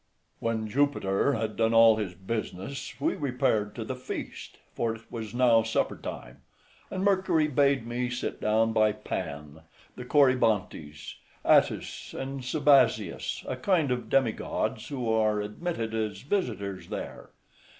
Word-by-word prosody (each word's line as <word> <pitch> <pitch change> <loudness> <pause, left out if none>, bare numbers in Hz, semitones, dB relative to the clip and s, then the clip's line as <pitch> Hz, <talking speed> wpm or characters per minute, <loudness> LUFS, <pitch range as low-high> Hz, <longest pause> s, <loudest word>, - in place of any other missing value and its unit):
When 110 -1 -1
Jupiter 135 -2 +1
had 110 -3 -2
done 115 0 +2
all 115 -1 +7
his 95 -5 -3
business 110 +6 -5
we 140 - +1
repaired 115 -6 0
to 115 - -4
the 130 - -4
feast, 130 - -7 0.2
for 115 -1 -1
it 115 - -14
was 110 -2 -6
now 120 -2 +5
supper 110 0 0
time, 60 0 -8 0.5
and 185 - -3
Mercury 185 -5 +2
bade 140 -4 +2
me 120 +1 -2
sit 125 0 -4
down 110 +1 +2
by 110 -1 +3
Pan, 75 -7 -6 0.3
the 125 - -7
Corybantes, 115 - +1 0.3
Attis, - - +2
and 135 0 -4
Sabazius, 135 - +2
a - - -2
kind 150 +1 +1
of 125 -2 -2
demi 130 -4 +3
gods - - -3
who 130 -5 -4
are 110 -1 +2
admitted 110 +2 -4
as 110 -2 -2
visitors 115 - -3
there. - - -6
115 Hz, 140 wpm, -28 LUFS, 105-135 Hz, 0.5 s, all